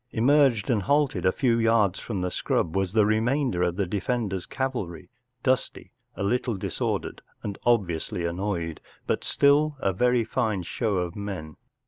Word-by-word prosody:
Emerged 130 -2 +3
and 110 -4 +2
halted 135 - +1
a - - +7
little 115 -4 +4
from 100 -1 -5
the 90 0 -1
scrub 80 - -1
was 95 -2 0
the 110 0 +4
remainder 115 0 +1
of 90 -1 +1
the 100 0 0
defender’s 100 0 -2
cavalry, 120 - -4 0.3
dusty, 130 -1 -1 0.2
a - - -3
little 120 +1 0
disordered - - -3 0.2
and 100 -1 -5
obviously 90 -7 +1
annoyed, 85 -2 -3 0.2
but - - -1
still 145 +1 +3
a 95 -6 0
very 125 +4 +2
fine 110 -5 -1
show 105 +4 -1
of 90 -1 -2
men. 95 -7 -6
105 Hz, 150 wpm, -26 LUFS, 90-125 Hz, 0.3 s, a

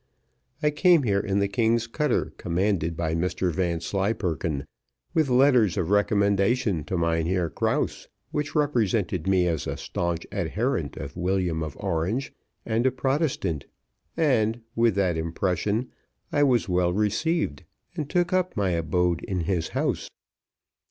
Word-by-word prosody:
I 150 - +4
came 170 0 +4
here 100 -4 +2
in 100 -1 -1
the 100 0 +2
king's 115 +2 +1
cutter, 145 +3 -1
commanded 85 -2 0
by 80 -2 -1
Mr 90 +2 0
Vanslyperken, 85 -3 -1 0.5
with 160 -5 +2
letters 125 -6 +4
of 90 -1 -1
recommendation 100 -2 +2
to 90 - -2
Mynheer 85 +1 0
Krause, - - -1 0.2
which 150 +1 -3
represented 110 - +1
me 95 -2 +3
as 80 -4 -1
a - - -3
staunch 85 -1 -3
adherent - - -1
of 70 +1 -7
William 90 -2 0
of 75 -3 -5
Orange 95 - -1 0.3
and 115 +3 +1
a - - +3
Protestant, 130 - -1 0.5
and, 120 -7 +2
with 115 -3 +3
that 95 -4 +1
impression, 95 +7 -1 0.4
I 145 0 +3
was 125 -5 +2
well 90 -1 +2
received, 105 - 0 0.3
and 150 -4 -4
took 180 0 +1
up 185 -6 0
my 100 -3 +1
abode 85 +1 +1
in 95 -2 -2
his 85 -1 -1
house. - - -1
100 Hz, 140 wpm, -26 LUFS, 85-120 Hz, 0.5 s, I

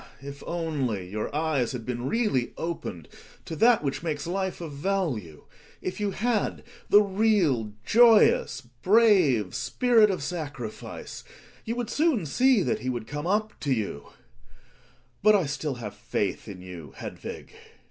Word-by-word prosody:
If 140 0 -8
only 140 - -2
your 105 +3 -3
eyes 150 -6 0
had 120 -3 -6
been 125 +1 -3
really 210 - 0
opened 160 - -5 0.4
to 160 - -5
that 230 -4 +5
which 135 -2 -2
makes 155 -4 -3
life 190 +2 -2
of 165 -4 -6
value 140 - -2 0.2
— - - -27
if 185 - -9
you 205 -1 0
had 215 +2 -1 0.3
the 205 +1 +7
real, 190 - +1
joyous, 230 -2 +5 0.2
brave 180 - +4
spirit 220 - +3
of 185 -7 -2
sacrifice 145 -9 -6 0.4
you 230 - -2
would 240 -2 -3
soon 295 - +2
see 250 - +3
that 220 - 0
he 130 - -3
would 120 -3 -3
come 145 +6 -5
up 210 +2 0
to 140 - -2
you 105 - -2 1.1
But 215 +1 +6
I 190 -5 +2
still 145 0 -3
have 115 -4 -7
faiths 100 -1 -3
in 95 -3 -9
you, 85 -7 -9
Hedvig. - - -8
160 Hz, 150 wpm, -27 LUFS, -, 1.1 s, the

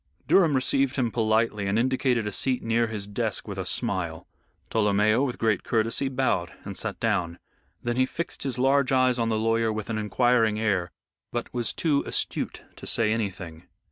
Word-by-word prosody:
Durham 165 -7 +5
received 135 +1 +1
him 120 -4 0
politely 110 -2 +1
and 100 +2 +1
indicated 125 -1 +1
a 105 - -2
seat 130 +2 -1
near 115 +1 +2
his 105 -3 -4
desk 100 0 -3
with - - -5
a - - -3
smile. 85 -4 -2 0.5
Tolomeo, 110 +2 +3
with 125 -3 -2
great 110 -4 +1
courtesy, 115 +4 0
bowed 125 -10 0
and - - -6
sat - - -3
down. 85 0 0 0.5
Then 120 0 -1
he 130 0 +3
fixed 170 +5 -5
his 135 -3 -2
large 135 +1 +3
eyes 130 -1 +3
on 115 -1 +1
the 110 - +1
lawyer 115 0 +1
with 110 +1 -4
an 110 - -1
inquiring 110 0 +2
air, 100 -5 0 0.4
but 120 -1 -4
was 120 -2 -1
too 150 -4 +1
astute - - -2
to - - -9
say 110 -2 +1
anything. 90 -6 -4
115 Hz, 180 wpm, -26 LUFS, 105-130 Hz, 0.5 s, Durham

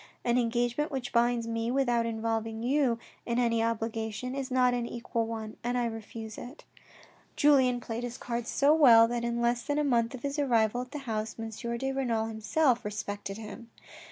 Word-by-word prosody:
An 240 +1 +3
engagement 240 +5 0
which 265 -4 -4
binds 235 -1 +2
me 230 0 -2
without 245 -3 +1
involving 225 0 -2
you 260 -2 +2 0.3
in 235 0 -2
any 230 -2 +2
obligation 225 +1 -2
is 275 -1 -3
not 250 -1 +3
an 240 -1 -1
equal 235 -1 -3
one 220 -1 -6
and 245 +1 0
I 245 - +1
refuse 225 -1 -6
it." 260 +6 -10 0.7
Julien 260 -4 +4
played 230 0 -5
his 245 0 -5
cards 235 -1 -4
so 285 +2 +4
well, 235 -8 +7
that 240 0 -2
in 235 0 -1
less 240 0 +2
than 290 +3 -2
a 300 - +2
month 240 -3 +1
of 240 - -11
his 280 +1 -2
arrival 240 -4 +2
at 250 - -8
the 290 -2 -7
house, 220 -2 -3
M. 225 -1 -5 0.3
de 270 +3 -2
Renal 240 -5 0
himself 235 +3 +1
respected 205 -1 -5
him. 225 +2 -9
235 Hz, 185 wpm, -29 LUFS, 225-250 Hz, 0.7 s, well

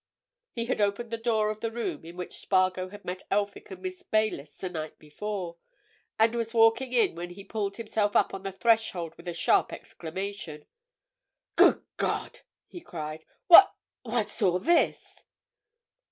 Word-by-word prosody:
He 230 -2 -3
had 235 - -1
opened 205 +3 0
the 230 - -1
door 220 -2 +1
of 215 - -7
the 230 - -2
room 205 -10 -4
in 170 +2 -10
which 180 - -7
Spargo 185 -1 +1
had 205 +1 -12
met 185 +1 -4
Elphick 205 - -1
and 385 -2 -10
Miss 370 -1 -5
Baylis 215 - -1
the 185 - -4
night 155 -3 -6
before, 175 +2 -5 0.6
and 225 +1 +4
was 230 0 -3
walking 225 +3 +4
in 245 -2 +3
when 175 +1 -6
he 190 +3 -10
pulled 200 -1 -3
himself 215 -2 -1
up - - +3
on 195 - -5
the 195 0 -4
threshold 190 -6 +1
with 170 - -14
a 175 - -2
sharp - - +2
exclamation. 170 -3 -7 0.9
"Good - - +5
God!" - - -2 0.3
he 350 - -11
cried. 155 - -7 0.2
"What—what's 240 - +4
all 180 -3 +3
this?" 330 - +1
205 Hz, 160 wpm, -28 LUFS, 180-230 Hz, 0.9 s, Good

